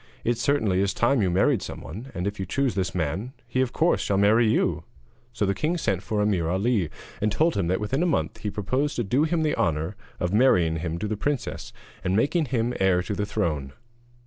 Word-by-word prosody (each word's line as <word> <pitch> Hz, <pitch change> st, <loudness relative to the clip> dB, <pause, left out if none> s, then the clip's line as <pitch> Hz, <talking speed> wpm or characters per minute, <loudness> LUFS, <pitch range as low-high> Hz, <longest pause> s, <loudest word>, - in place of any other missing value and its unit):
It 120 Hz, 0 st, 0 dB
certainly 110 Hz, -8 st, +2 dB
is 100 Hz, 0 st, 0 dB
time 120 Hz, +1 st, +2 dB
you 95 Hz, -, +2 dB
married 100 Hz, +6 st, +2 dB
someone, 115 Hz, +12 st, -8 dB
and 90 Hz, -, -2 dB
if 100 Hz, 0 st, -3 dB
you 95 Hz, -, -2 dB
choose 135 Hz, +4 st, 0 dB
this 95 Hz, -3 st, -2 dB
man, 90 Hz, -, -2 dB, 0.2 s
of 130 Hz, -1 st, +1 dB
course 170 Hz, +2 st, +2 dB
he -, -, -3 dB
shall 100 Hz, -, +1 dB
marry 110 Hz, +3 st, +4 dB
you.' -, -, +1 dB, 0.5 s
So 110 Hz, -3 st, -1 dB
the 100 Hz, -, +1 dB
king 160 Hz, -, -1 dB
sent 100 Hz, -, 0 dB
for 105 Hz, -1 st, -1 dB
Ameer 90 Hz, -6 st, +1 dB
Ali, 95 Hz, -1 st, +1 dB, 0.3 s
and 105 Hz, 0 st, +1 dB
told 160 Hz, +9 st, +2 dB
him 85 Hz, -, 0 dB
that 95 Hz, +2 st, +1 dB
within 120 Hz, +8 st, -1 dB
a 180 Hz, -, +2 dB
month 165 Hz, -, -1 dB
he 105 Hz, -, -3 dB
proposed 130 Hz, +9 st, -1 dB
to 120 Hz, -, 0 dB
do 130 Hz, +9 st, +2 dB
him 165 Hz, 0 st, 0 dB
the 150 Hz, -, +1 dB
honour 80 Hz, -1 st, 0 dB, 0.2 s
of 90 Hz, +2 st, -1 dB
marrying 90 Hz, -9 st, +4 dB
him 80 Hz, 0 st, -3 dB
to 105 Hz, -, -3 dB
the 105 Hz, 0 st, -2 dB
princess, 145 Hz, +2 st, -3 dB, 0.3 s
and 95 Hz, +1 st, +1 dB
making 145 Hz, -, +2 dB
him 120 Hz, -2 st, -1 dB
heir 95 Hz, -2 st, +3 dB
to 95 Hz, -, -3 dB
the 105 Hz, +1 st, -2 dB
throne. 75 Hz, -11 st, -2 dB
105 Hz, 225 wpm, -25 LUFS, 95-130 Hz, 0.5 s, marry